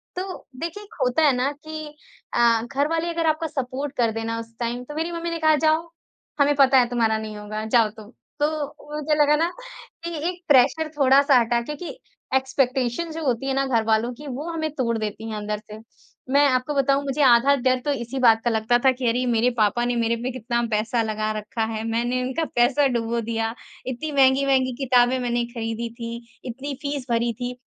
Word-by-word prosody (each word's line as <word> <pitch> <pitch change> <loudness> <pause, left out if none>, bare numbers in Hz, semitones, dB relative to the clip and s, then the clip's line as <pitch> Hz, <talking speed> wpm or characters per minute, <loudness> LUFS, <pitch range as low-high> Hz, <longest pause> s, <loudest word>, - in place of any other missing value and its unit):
तो 370 +1 -6
देखिए 340 +5 -5
एक 425 +2 -16
होता 250 +5 +2
है 290 - +6
ना 255 +3 0
कि 310 +1 -8 0.5
अ, 235 -1 +4
घर 275 +4 -1
वाले 330 +1 -1
अगर 335 -1 -1
आपका 315 +1 +1
सपोर्ट 275 -1 -4
कर 235 -2 +2
देना 225 +1 -3
उस 230 0 -9
टाइम 240 +1 -3
तो - - -8
मेरी 325 +2 -2
मम्मी 340 0 -3
ने 335 - -3
कहा, 315 -1 +4
"जाओ, 315 +2 +1 0.5
हमें 285 +1 +4
पता 275 -1 +5
है 245 -2 +5
तुम्हारा 225 -2 +1
नहीं 215 -1 -6
होगा, 210 +1 -5
जाओ 225 -1 +3
तुम।" 215 0 -12 0.3
तो 295 0 -3
मुझे 300 0 0
लगा 295 +1 +4
ना। 330 +3 +1 0.5
कि 340 0 -4
एक 360 0 -8
प्रेशर 290 +3 +4
थोड़ा-सा 275 -1 +5
हटा 235 0 +1
क्योंकि 300 +7 -7 0.4
एक्सपेक्टेशन 265 +2 0
जो 320 0 -5
होती 255 0 0
है 270 - 0
ना 275 0 +1
घरवालों 225 -2 +1
की 290 +5 -11
वो 280 +5 -5
हमें 315 -1 -2
तोड़ 235 -4 0
देती 215 +1 -4
है 220 - -4
अंदर 210 0 -3
से। 215 - -8 0.5
मैं 285 +1 +6
आपको 255 +2 0
बताऊँ 275 0 +2
मुझे 275 +2 -1
आधा 260 +2 +6
डर 255 -1 +1
तो 290 - +1
इसी 265 0 -4
बात 225 -3 +5
का 240 - +2
लगता 225 +1 +2
था 265 - +7
कि 255 -1 -3
अरे 235 +2 0
ये 255 - 0
मेरे 235 0 +3
पापा 220 +2 +2
ने 245 0 0
मेरे 230 0 +1
पे 255 - -2
कितना 235 -1 -2
पैसा 220 +3 +1
लगा 215 0 -2
रखा 220 +2 -3
है, 220 0 -3
मैंने 240 +2 0
इनका 260 +6 -1
पैसा 245 +4 +3
डुबो 235 -2 -1
दिया, 225 0 -2 0.3
इत्ती 260 +5 -4
महँगी-महँगी 265 -1 +3
किताबें 250 0 +4
मैंने 240 -1 -1
खरीदी 230 0 -3
थी, 235 0 -6 0.3
इतनी 265 +4 -5
फीस 285 -2 -3
भरी 235 0 +1
थी। 245 0 -2
255 Hz, 205 wpm, -23 LUFS, 230-290 Hz, 0.5 s, था